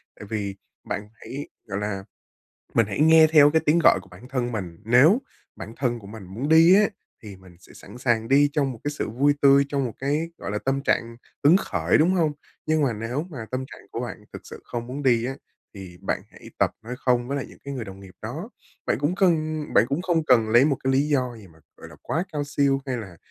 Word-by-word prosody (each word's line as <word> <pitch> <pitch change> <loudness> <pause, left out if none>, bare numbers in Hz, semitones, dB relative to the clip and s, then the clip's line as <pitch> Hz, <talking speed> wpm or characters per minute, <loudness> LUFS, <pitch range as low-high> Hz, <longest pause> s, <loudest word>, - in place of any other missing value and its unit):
Tại - - -11
vì 100 -3 -3 0.3
bạn 105 +2 -5
hãy, 140 +5 -8 0.2
gọi 100 -1 -4
là 105 -2 -3 0.7
mình 115 -2 +4
hãy 105 +5 -4
nghe 160 +1 +7
theo 145 -2 +7
cái 160 +1 +3
tiếng 155 +3 +4
gọi 155 - +5
của - - -19
bản 100 +8 -14
thân 125 -2 -2
mình, 90 -7 -5
nếu 130 - +5 0.4
bản 110 - -8
thân 120 -3 -1
của 100 - -13
mình 105 -1 -10
muốn 110 +10 -5
đi 165 +3 +7
á, 205 +1 +5 0.3
thì 105 -3 -10
mình 95 -2 -17
sẽ - - -18
sẵn 105 +6 -13
sàng 115 -3 0
đi 145 +2 +4
trong 140 -3 0
một 115 - -12
cái 145 - 0
sự 150 - -4
vui 140 +6 +2
tươi, 140 0 +6
trong 140 -1 -1
một 120 - -3
cái, 150 +5 -1
gọi - - -5
là, 105 - -1
tâm 135 +1 0
trạng 115 -3 0 0.3
hứng 160 +6 +7
khởi, 90 - +1
đúng 170 +4 +3
hông? 160 -5 +2 0.3
Nhưng 155 0 +2
mà 135 -4 +2
nếu 115 +6 -3
mà 120 -8 -7
tâm 130 +1 -3
trạng - - -14
của - - -4
bạn - - -6
thực - - -9
sự - - -10
không 120 0 -5
muốn 135 +4 -6
đi 120 -4 +3
á, 135 +2 -3 0.4
thì 95 -3 -10
bạn - - -2
hãy - - -14
tập - - +3
nói 120 +3 -6
không 125 -2 +1
với 140 - -2
lại 140 - -3
những - - -16
cái 140 0 -5
người 125 -4 -4
đồng 95 -1 -10
nghiệp 95 -1 -14
đó. - - -6 0.4
Bạn - - +1
cũng 145 +5 0
cần 155 -5 +1
bạn 105 - +6
cũng 140 +6 -1
không 170 -3 +1
cần 120 -6 +4
lấy 120 +4 +6
một 145 -2 +2
cái 135 - +2
lý 140 +3 +2
do 125 -5 0
gì 105 -3 -13
mà, 80 -2 -21 0.2
gọi - - -12
là, - - -14
quá 165 +3 -1
cao 145 -1 -2
siêu, 140 -1 +1
hay 130 -2 -2
là 95 -7 -8
130 Hz, 250 wpm, -24 LUFS, 110-145 Hz, 0.7 s, nghe